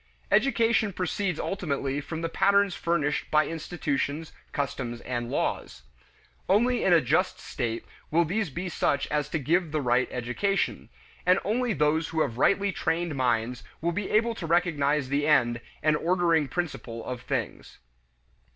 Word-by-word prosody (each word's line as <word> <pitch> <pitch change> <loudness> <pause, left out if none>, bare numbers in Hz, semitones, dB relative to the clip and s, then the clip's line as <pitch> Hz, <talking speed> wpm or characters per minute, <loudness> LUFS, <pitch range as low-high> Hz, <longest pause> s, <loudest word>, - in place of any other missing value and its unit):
Education 230 -5 +3
proceeds 180 -1 -2
ultimately 145 -7 -2
from 160 +3 -5
the 165 - 0
patterns 200 +2 +3
furnished 150 -4 -1
by 155 0 +4
institutions, 160 -1 -3 0.2
customs, 130 -4 -3
and 120 -1 -3
laws. 60 - -2 0.7
Only 240 +6 +3
in 190 - +3
a 170 -2 +6
just 155 +9 +1
state 115 -4 -4 0.2
will 170 +2 +3
these 195 +3 -1
be 175 +7 -4
such 145 -4 0
as 150 -1 0
to 160 - -1
give 160 +3 +1
the 155 - 0
right 125 -1 +2
education; 125 +12 -1 0.3
and 180 +1 +5
only 235 +2 +1
those 150 +1 +1
who 160 -1 -1
have 120 -5 -1
rightly 200 +4 +3
trained 170 -2 -1
minds 125 -2 0 0.2
will 170 +2 0
be 195 +3 -3
able 230 +2 +2
to 175 -7 -6
recognize 150 -5 +1
the 145 +2 +1
end, 120 -5 +3 0.2
and 155 0 +4
ordering 170 -2 +2
principle 135 -9 -4
of 125 -1 -5
things. 130 -4 -4
160 Hz, 150 wpm, -27 LUFS, 135-180 Hz, 0.7 s, a